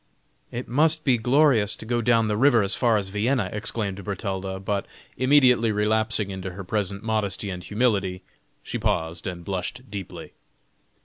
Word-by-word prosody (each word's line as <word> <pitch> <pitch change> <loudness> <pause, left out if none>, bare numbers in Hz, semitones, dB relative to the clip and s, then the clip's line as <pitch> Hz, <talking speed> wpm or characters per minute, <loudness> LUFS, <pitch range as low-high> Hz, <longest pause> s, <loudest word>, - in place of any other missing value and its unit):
"It 120 +1 -5
must 155 +5 +3
be 125 -4 +3
glorious 125 -4 +3
to - - -11
go 120 +1 0
down 115 -1 +3
the 105 - 0
river 120 -1 +4
as 100 - +6
far 115 -3 +2
as 100 -2 -3
Vienna!" 105 +1 0
exclaimed 105 -2 -2
Bertalda, 95 -2 -4
but 100 +1 -2 0.3
immediately 130 -3 +4
relapsing 105 0 0
into 95 -1 -6
her 100 +2 -7
present 100 +1 -2
modesty 105 -3 -1
and 90 -1 -6
humility, 100 -5 0 0.4
she - - -4
paused 80 +2 -2
and 85 -2 -6
blushed 100 +7 -5
deeply. 100 -3 -7
105 Hz, 160 wpm, -24 LUFS, 95-120 Hz, 0.4 s, as